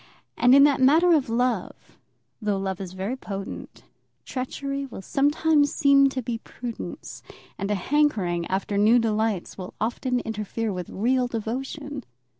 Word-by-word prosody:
And 245 +2 +5
in 280 - +8
that 285 -2 +4
matter 320 +7 +5
of 290 -7 +2
love, 235 -3 -2 0.4
though 210 -2 0
love 190 -1 -3
is 185 -1 -7
very 195 +7 -3
potent, 195 -6 -7 0.4
treachery 275 +2 -4
will 205 -6 -9
sometimes 290 +2 +2
seem 275 -1 +5
to 260 -2 -4
be 230 0 -3
prudence, 240 -1 -8 0.3
and 200 0 -4
a 210 - +1
hankering 195 - +1
after 195 +1 -1
new 220 +4 +5
delights 220 -5 -1
will 185 - -8
often 245 +3 -1
interfere 220 0 -3
with 180 -2 -5
real 250 +5 +1
devotion. 265 +5 -5
240 Hz, 145 wpm, -25 LUFS, 205-275 Hz, 0.4 s, in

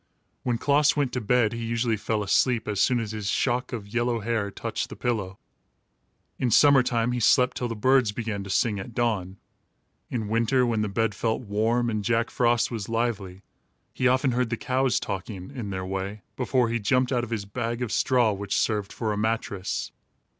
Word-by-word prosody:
When 120 -2 0
Klaas 145 +4 +3
went 140 -4 0
to 125 - -1
bed 115 0 +2
he 115 0 -4
usually 115 0 0
fell 110 0 -2
asleep 115 +4 +2
as 105 -2 0
soon 125 -1 +3
as 110 -2 -4
his 105 -2 -3
shock 125 +2 0
of 110 -5 -5
yellow 120 +2 0
hair 110 -2 -1
touched - - -4
the - - -8
pillow. 105 -6 -2 1.0
In 125 - +1
summer 140 +3 +6
time 120 -2 0
he 125 - -1
slept 125 +2 +4
till 125 - -2
the 115 - -4
birds 130 0 +3
began 105 -2 -4
to 100 - -9
sing, 100 +2 +1
at 110 +4 -8
dawn. 100 -6 -1 0.7
In 110 -4 -3
winter, 115 +4 +2
when 115 -3 0
the 105 - -1
bed 115 +1 0
felt 110 +4 -1
warm 115 +2 0
and 110 -3 -1
Jack 115 +2 +1
Frost 120 -1 +2
was 110 -4 -4
lively, 110 -5 -2 0.5
he 130 - +1
often 130 +1 +3
heard 125 -1 0
the 120 - -2
cows 130 +1 +1
talking, 95 +1 -6
in 120 -7 -5
their 95 -1 -4
way, 95 +2 -4
before 125 -2 +1
he 120 0 0
jumped 125 +4 +1
out 120 -2 +1
of 120 - -5
his 110 -4 -3
bag 115 +3 -3
of 115 - -4
straw, 125 -4 +3
which 100 0 -2
served 105 -3 0
for 110 -3 -2
a - - -3
mattress. 105 -3 -2
115 Hz, 200 wpm, -26 LUFS, 105-125 Hz, 1.0 s, summer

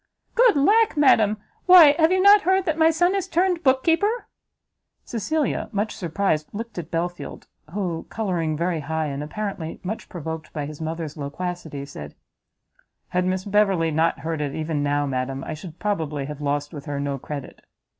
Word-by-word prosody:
"Good 480 -4 +5
lack, 420 +7 +3
madam, 220 -7 +4 0.3
why 345 -6 +9
have 320 0 +5
not 400 +3 +6
you - - -16
heard 380 +1 +3
that 320 -4 0
my 320 0 +5
son 350 +3 +2
is 390 -2 -1
turned 360 0 +1
book 260 -3 +3
keeper?" 410 +8 +1 0.8
Cecilia, 290 +6 -1
much 210 0 -2
surprised, 165 -3 -1
looked 225 -2 -6
at 165 -1 -7
Belfield, 175 +1 -4 0.3
who, 175 -4 -3
colouring 175 -8 -1
very 170 0 -1
high, 160 +2 -2
and 140 -1 -4
apparently 165 +1 -5
much 210 +5 -5
provoked 160 -2 -6
by 150 -2 -3
his 150 +1 -8
mother's 160 -1 -4
loquacity, 150 0 -5
said, 75 - -9 0.9
"Had 180 0 0
Miss 185 0 -1
Beverley 195 -5 +2
not 160 +2 +1
heard 160 -1 -3
it 145 -2 -3
even 155 -2 -2
now, 145 0 +1
madam, 135 0 -3
I - - -5
should 155 +1 -9
probably 160 -9 -2
have 150 +1 -7
lost 145 0 -2
with 145 -1 -8
her 145 -2 -3
no 140 -1 -2
credit." 140 +1 -8
175 Hz, 175 wpm, -23 LUFS, -, 0.9 s, why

